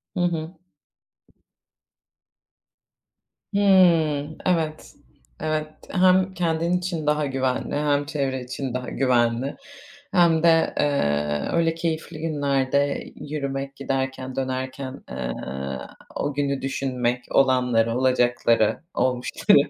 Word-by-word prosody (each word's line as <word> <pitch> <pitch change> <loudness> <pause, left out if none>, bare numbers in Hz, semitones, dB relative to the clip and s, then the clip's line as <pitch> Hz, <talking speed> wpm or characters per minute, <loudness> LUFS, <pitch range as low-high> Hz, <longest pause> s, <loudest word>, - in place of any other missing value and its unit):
Hı - - -2
hı. 165 0 -2 3.0
Hımm, 165 -7 +4
evet. 160 -4 -1 0.5
Evet, 155 0 -1 0.2
hem 185 0 +4
kendin 170 -1 0
için 175 -4 -3
daha 150 0 +2
güvenli, 130 -1 -1
hem 145 -1 +1
çevre 135 -4 -2
için 125 0 -5
daha 125 0 -3
güvenli, 125 0 +1 0.6
hem 170 -2 +4
de, 165 -1 +4
eee, 75 - +1
öyle 165 -1 +2
keyifli 165 -1 -3
günlerde 140 -2 0
yürümek, 140 -2 -4
giderken, 135 -1 -3
dönerken, 130 0 -4
eee, 60 0 -4 0.8
o 145 - -1
günü 140 -1 -1
düşünmek, 125 -2 -1
olanları, 125 -3 +3
olacakları, 120 -3 +2
olmuşları. 125 -1 +3
140 Hz, 95 wpm, -24 LUFS, 130-160 Hz, 3.0 s, Hımm